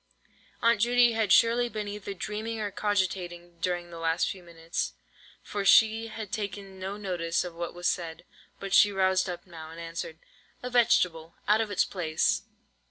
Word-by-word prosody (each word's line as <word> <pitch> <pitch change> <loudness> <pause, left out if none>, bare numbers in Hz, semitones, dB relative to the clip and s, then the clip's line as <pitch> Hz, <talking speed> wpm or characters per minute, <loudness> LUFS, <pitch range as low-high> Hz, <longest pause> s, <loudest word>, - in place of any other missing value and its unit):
Aunt 230 -2 +4
Judy 240 +1 +5
had 220 -3 0
surely 240 +1 +5
been 215 -2 -4
either 205 -1 -6
dreaming 215 +4 -4
or 205 -1 -2
cogitating 180 -4 -2
during 175 -1 -2
the 165 - -8
last 165 +1 +1
few 190 - -5
minutes, 165 - -4 0.5
for 205 -1 -3
she 220 +2 +5
had 220 -2 -7
taken 200 -2 -5
no 190 +2 -4
notice 175 -5 -1
of 180 -1 -6
what 170 +1 -5
was 175 0 -1
said, 165 -2 -2 0.3
but 195 -1 -5
she 205 - +7
roused 190 -1 +2
up 175 - -6
now, 160 -3 -10
and 165 +1 -10
answered:— 165 -1 -6 0.5
"A 250 - -4
vegetable 175 -9 +2
out 215 +2 +4
of 220 - -2
its 205 - +2
place." 160 -4 0
190 Hz, 170 wpm, -28 LUFS, 170-210 Hz, 0.5 s, she